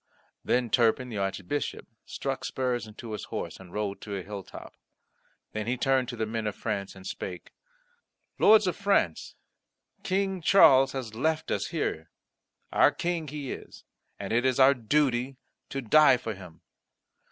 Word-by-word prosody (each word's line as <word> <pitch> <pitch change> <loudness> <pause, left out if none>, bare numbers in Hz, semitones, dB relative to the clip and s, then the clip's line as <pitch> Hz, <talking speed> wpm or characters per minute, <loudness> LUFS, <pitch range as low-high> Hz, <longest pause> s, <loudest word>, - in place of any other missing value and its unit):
Then 125 -2 0
Turpin 120 +1 +2
the 110 -4 -4
Archbishop 95 +7 -3 0.2
struck 135 -1 -4
spurs 125 -4 -2
into 110 +1 -9
his 105 - -5
horse, - - -5
and 90 -2 -13
rode 105 -1 -3
to 105 -2 -5
a 95 - -5
hilltop. 100 0 -9 0.8
Then 110 0 -4
he 125 +1 0
turned 130 -1 +1
to 120 - -5
the 110 -1 -1
men 110 0 -3
of 105 - -3
France, 100 -1 -4
and 95 0 -13
spake: 90 -2 -6 0.9
"Lords 215 -1 +7
of 180 - 0
France, 195 - 0 0.7
King 190 -1 -1
Charles 135 -7 +6
has 125 -5 -5
left 155 +7 -1
us - - -1
here; 85 - -3 0.6
our - - +6
King 170 -2 -2
he 145 -2 -5
is, - - -9 0.4
and 100 +1 -4
it 120 +1 +2
is 130 0 +1
our 135 +1 +7
duty 130 +1 0 0.3
to 135 -1 -4
die 150 +3 +6
for 115 -2 -5
him. 90 -4 -13
125 Hz, 160 wpm, -28 LUFS, 105-140 Hz, 0.9 s, Lords